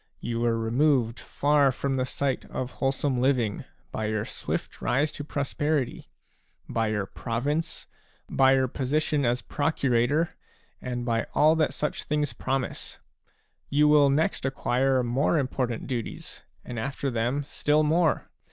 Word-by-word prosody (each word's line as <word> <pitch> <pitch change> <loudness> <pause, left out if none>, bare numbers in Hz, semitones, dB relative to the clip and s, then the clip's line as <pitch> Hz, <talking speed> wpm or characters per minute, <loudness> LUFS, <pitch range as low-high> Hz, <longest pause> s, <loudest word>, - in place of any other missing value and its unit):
You 115 0 -3
were 115 -1 +2
removed 120 +1 +2
far 145 -1 +2
from 135 +1 -2
the 130 0 0
sight 135 0 -1
of 125 -1 -4
wholesome 135 -1 0
living 125 -6 +1 0.3
by 110 - -2
your 110 0 -1
swift - - -5
rise 145 +4 +1
to 145 - -6
prosperity, 145 -1 -1 0.6
by 115 -1 0
your 105 -2 -1
province, 140 - -2 0.4
by 135 0 +4
your 130 -1 +2
position 145 +2 0
as 120 0 +1
procurator/ 140 +1 +1 0.5
and 120 -1 -3
by 115 -1 0
all 155 +2 +5
that 155 - +1
such 150 - -2
things 150 -1 0
promise; 135 -1 -3 0.7
you 150 +1 +4
will 150 -1 +6
next 155 +8 +1
acquire 135 -1 +1
more 130 +7 +1
important 130 -4 -1
duties 120 -4 -5 0.2
and 120 -2 -5
after 135 +3 -2
them 120 +5 0
still 150 +2 +1
more. 160 +1 +2
135 Hz, 140 wpm, -27 LUFS, 120-145 Hz, 0.7 s, will